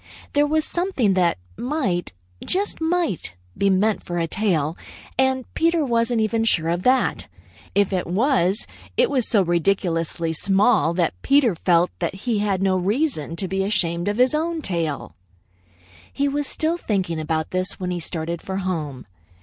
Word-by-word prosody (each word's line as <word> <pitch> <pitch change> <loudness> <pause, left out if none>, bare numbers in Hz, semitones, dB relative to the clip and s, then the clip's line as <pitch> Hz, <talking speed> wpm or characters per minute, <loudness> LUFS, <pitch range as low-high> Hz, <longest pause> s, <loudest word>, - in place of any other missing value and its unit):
There 290 0 +3
was 310 +1 +1
something 345 - +1
that 180 -2 +2 0.2
might, 245 - -1 0.3
just 390 -2 -2
might, 320 - -1 0.2
be 200 - +2
meant 200 +3 +2
for 175 - -4
a 170 - +1
tail, 165 -5 0 0.4
and 260 -1 +1
Peter 330 -1 +2
wasn't 230 -1 +1
even 225 +1 +1
sure 165 -7 +2
of 170 +1 0
that. 255 +5 +2 0.5
If 200 -1 +2
it 185 - -1
was, 205 - +2 0.3
it - - +3
was 255 -5 +2
so 205 -4 +4
ridiculously 170 -2 0
small 195 0 +2
that 170 -2 +1
Peter 275 -6 +4
felt 170 +1 +2
that 170 +1 -2
he 215 +2 -1
had 195 -2 0
no 190 -1 +2
reason 195 - -1
to 190 +2 -2
be 195 +1 -1
ashamed 175 -3 0
of 205 +1 0
his 250 +2 +4
own 320 +1 -1
tail. 165 -6 -2 1.0
He 280 - 0
was 285 0 -1
still 320 +2 0
thinking 190 - -1
about 155 0 -2
this 185 +1 0
when 180 -1 -3
he 175 - -2
started 165 0 -4
for 190 0 -4
home. 160 -9 -3
195 Hz, 165 wpm, -22 LUFS, 170-260 Hz, 1.0 s, so